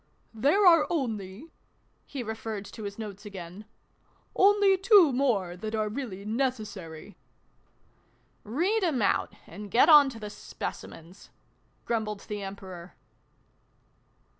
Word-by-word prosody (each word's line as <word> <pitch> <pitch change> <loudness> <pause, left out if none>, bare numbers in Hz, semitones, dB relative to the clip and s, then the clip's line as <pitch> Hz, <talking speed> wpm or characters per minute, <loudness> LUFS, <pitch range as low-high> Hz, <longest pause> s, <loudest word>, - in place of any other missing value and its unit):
" - - -40
There 395 +7 +4
are 335 -4 +6
only," 230 - -4 0.6
(he 270 -3 -5
referred 220 -2 -5
to 215 +1 -9
his 200 0 -6
notes 210 -3 -8
again) 195 -1 -9 0.3
" - - -39 0.3
only 400 0 +5
two 380 - +5
more, 220 -10 0
that 215 +4 -5
are 215 -1 -1
really 210 -5 -6
necessary." 210 - -4 0.7
" - - -39
Read 360 - 0
'em 285 - +1
out, - - +1
and 205 0 -10
get 235 - +4
on 295 -3 +8
to 235 -4 -9
the 210 -1 -7
Speci - - -7
mens" 170 +5 -15 0.6
grumbled 215 -3 -2
the 210 -1 -6
Emperor. 190 -3 -9
220 Hz, 135 wpm, -28 LUFS, 200-280 Hz, 0.7 s, on